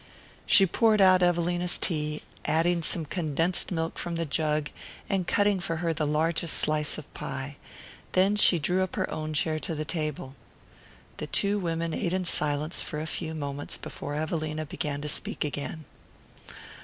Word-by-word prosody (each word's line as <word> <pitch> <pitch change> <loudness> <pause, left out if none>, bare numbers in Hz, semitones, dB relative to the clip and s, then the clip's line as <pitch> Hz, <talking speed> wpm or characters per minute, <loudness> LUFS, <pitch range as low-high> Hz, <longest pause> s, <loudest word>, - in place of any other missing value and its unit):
She 195 - +7
poured 215 +3 +3
out 185 -1 +6
Evelina's 175 0 +2
tea, 150 -2 -2 0.2
adding 165 +3 +2
some 165 0 +2
condensed 165 +3 0
milk 165 -2 -2
from 170 -1 -3
the 165 0 -1
jug, 150 0 0 0.4
and 190 -3 -1
cutting 205 -1 +2
for 165 -2 -2
her 165 0 -1
the 155 -1 -1
largest 160 +2 +2
slice 150 0 +2
of 155 - -11
pie; 135 +1 -5 0.6
then 190 +3 +4
she 200 -3 +6
drew 180 +4 +1
up 185 - -2
her - - 0
own 155 0 -4
chair 155 +1 +1
to 165 0 -3
the 155 0 -3
table. 150 -5 -4 0.8
The - - -5
two 200 +1 +1
women 165 -2 -2
ate 175 +2 -1
in 185 -1 0
silence 150 0 0
for 150 - -4
a 155 - -3
few 160 0 -3
moments 145 -1 -4
before 145 - -6
Evelina 155 0 -2
began 145 0 -4
to 150 - -4
speak 150 - 0
again. 145 +2 -4
160 Hz, 165 wpm, -27 LUFS, 150-175 Hz, 0.8 s, She